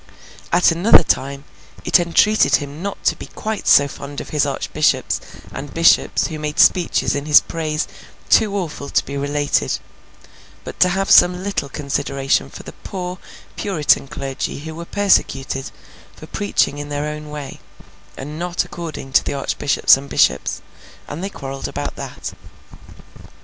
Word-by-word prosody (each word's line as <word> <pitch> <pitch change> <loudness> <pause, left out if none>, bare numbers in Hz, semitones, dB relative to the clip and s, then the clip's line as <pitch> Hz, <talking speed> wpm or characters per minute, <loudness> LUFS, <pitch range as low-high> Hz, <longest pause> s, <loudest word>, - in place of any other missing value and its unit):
At 175 0 +4
another 170 +3 +6
time 140 -1 -1 0.4
it - - +5
entreated 175 +5 +3
him 145 +2 -4
not 200 +1 -5
to - - +2
be - - -10
quite 220 -1 -5
so 145 - +6
fond 140 0 -8
of - - -8
his 150 -1 +1
archbishops 150 +2 0 0.3
and 135 0 -7
bishops 165 0 +4
who 155 -2 -5
made 150 +1 -4
speeches 175 0 +3
in 145 +1 -3
his 150 - +8
praise 155 -1 -3 0.4
too 210 -3 +3
awful 155 -6 -5
to - - +1
be 140 - -6
related, 145 +1 0 0.9
but - - -9
to 180 - +5
have 195 +2 -1
some 180 +1 +6
little 200 -8 -2
consideration 140 -1 -1
for - - -11
the - - -10
poor 180 -1 -6 0.4
Puritan 160 -8 +1
clergy 140 -1 -5
who 160 +1 -7
were 170 +2 -7
persecuted 135 -10 0 0.5
for - - -11
preaching 110 +7 -1
in 145 0 -6
their 145 0 -2
own 150 0 -6
way, 145 -2 -7 0.6
and 150 +4 -7
not 175 0 -1
according 160 -5 -7
to - - +5
the - - -3
archbishops 140 0 +3
and 140 +1 -9
bishops; - - +1 0.4
and 155 +5 -6
they 195 - -2
quarrelled 135 -6 -6
about - - -5
that. - - -7
150 Hz, 155 wpm, -19 LUFS, 140-175 Hz, 0.9 s, his